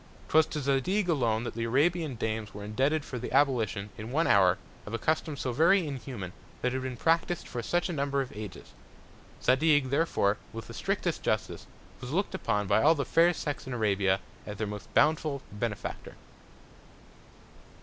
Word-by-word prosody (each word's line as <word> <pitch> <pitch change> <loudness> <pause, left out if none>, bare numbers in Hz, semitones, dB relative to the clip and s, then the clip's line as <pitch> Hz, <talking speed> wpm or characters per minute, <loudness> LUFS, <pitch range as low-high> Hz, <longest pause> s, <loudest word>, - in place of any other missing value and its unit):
'Twas 160 0 +5
to 150 - -4
Zadig 140 +9 +1
alone 120 -9 +1
that 120 - -4
the 115 0 -2
Arabian 150 +4 +1
Dames 110 -2 -3
were 105 - -7
indebted 135 +8 0
for 125 - -5
the 125 - -5
Abolition, 115 -7 +1
in 110 +2 -6
one 160 +5 +2
Hour, 95 - +5 0.3
of 110 - -3
a - - 0
Custom 155 +3 -1
so 130 - -2
very 170 +7 +4
inhuman, 125 - -6 0.3
that 125 0 +1
had 130 - -1
been 130 -1 -4
practis'd 165 +3 +1
for 120 - -4
such 175 +8 0
a 175 - -3
Number 140 -2 0
of 130 -5 -4
Ages. 105 -3 -8 0.7
Zadig, 140 0 +3
therefore, 140 -9 +2 0.2
with 115 -1 -6
the - - -10
strictest - - -1
Justice, - - -2 0.3
was 125 - -7
look'd 190 +8 -1
upon 110 - 0
by 110 - +3
all 160 +3 +6
the 140 -3 -1
Fair 170 +1 +4
Sex 145 -5 -4
in 130 - -4
Arabia, 100 -4 +2 0.3
as 105 -1 -6
their 110 - -1
most 105 -1 -7
bountiful 150 -2 +2
Benefactor. 105 +1 -4
130 Hz, 180 wpm, -29 LUFS, 110-155 Hz, 0.7 s, all